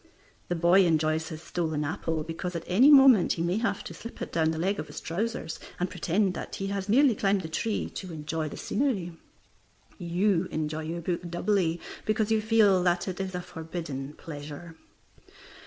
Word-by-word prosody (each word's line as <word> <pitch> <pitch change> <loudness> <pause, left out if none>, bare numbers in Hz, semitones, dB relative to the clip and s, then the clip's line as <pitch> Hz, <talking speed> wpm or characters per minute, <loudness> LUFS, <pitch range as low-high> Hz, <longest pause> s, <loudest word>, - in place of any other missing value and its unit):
The 175 - -1
boy 175 +3 +5
enjoys 160 0 +1
his 160 0 -8
stolen 160 -4 -2
apple, 160 -1 -2
because 170 +3 -5
at 165 - -3
any 235 +11 +5
moment 270 -9 +7
he 165 - -2
may 175 +3 0
have 230 - -1
to - - -8
slip 230 - -10
it - - -5
down 160 -1 +2
the 160 - -2
leg 195 +5 0
of - - -4
his - - -7
trousers, 180 -1 -3 0.2
and 180 +1 -1
pretend 190 +2 +1
that - - -6
he 195 - -4
has 200 0 -3
merely 260 +3 +5
climbed 200 -1 +1
the 165 - -6
tree 205 +7 -2
to 185 -2 -7
enjoy 155 0 -3
the - - -8
scenery. 205 -9 -1 0.8
You 180 +1 +1
enjoy 155 0 -3
your 170 +2 -4
book 175 +1 -3
doubly 175 -1 0 0.2
because 215 0 0
you 220 -1 +3
feel 215 -4 +4
that 175 +1 +1
it 185 -1 -4
is 190 -1 -3
a 180 - -2
forbidden 160 -5 -6
pleasure. 150 +2 -9
175 Hz, 190 wpm, -28 LUFS, 160-200 Hz, 0.8 s, moment